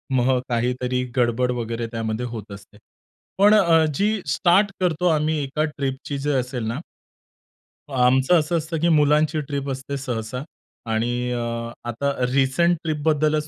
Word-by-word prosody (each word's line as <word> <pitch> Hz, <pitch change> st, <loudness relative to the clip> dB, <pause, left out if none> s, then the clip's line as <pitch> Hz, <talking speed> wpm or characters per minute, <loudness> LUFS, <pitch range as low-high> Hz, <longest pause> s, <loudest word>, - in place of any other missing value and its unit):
मग 130 Hz, 0 st, +3 dB
काहीतरी 125 Hz, +1 st, 0 dB
गडबड 125 Hz, +1 st, +2 dB
वगैरे 115 Hz, -1 st, -3 dB
त्यामध्ये 115 Hz, +1 st, -3 dB
होत 110 Hz, -4 st, -7 dB
असते. 100 Hz, +1 st, -12 dB, 0.6 s
पण 205 Hz, +2 st, +6 dB
अ, 170 Hz, -6 st, +5 dB
जी 210 Hz, +7 st, 0 dB
स्टार्ट 180 Hz, +8 st, +3 dB
करतो 180 Hz, -1 st, +1 dB
आम्ही 155 Hz, -1 st, +1 dB
एका 140 Hz, +3 st, -1 dB
ट्रिपची 140 Hz, +1 st, -3 dB
जर 140 Hz, -1 st, 0 dB
असेल 125 Hz, -1 st, -4 dB
ना 115 Hz, +5 st, -3 dB, 1.1 s
आमचं 130 Hz, +5 st, +4 dB
असं 160 Hz, +2 st, 0 dB
असतं 160 Hz, 0 st, -3 dB
की 170 Hz, +2 st, +2 dB
मुलांची 150 Hz, 0 st, +3 dB
ट्रिप 140 Hz, -1 st, -3 dB
असते 135 Hz, +1 st, -4 dB
सहसा 125 Hz, -1 st, -4 dB, 0.5 s
आणि 120 Hz, +2 st, -1 dB
अ, 120 Hz, -, -1 dB, 0.5 s
आता 140 Hz, +5 st, -1 dB, 0.2 s
रिसेंट 140 Hz, +6 st, +2 dB
ट्रिपबद्दलच 155 Hz, -1 st, +1 dB
135 Hz, 140 wpm, -23 LUFS, 125-155 Hz, 1.1 s, पण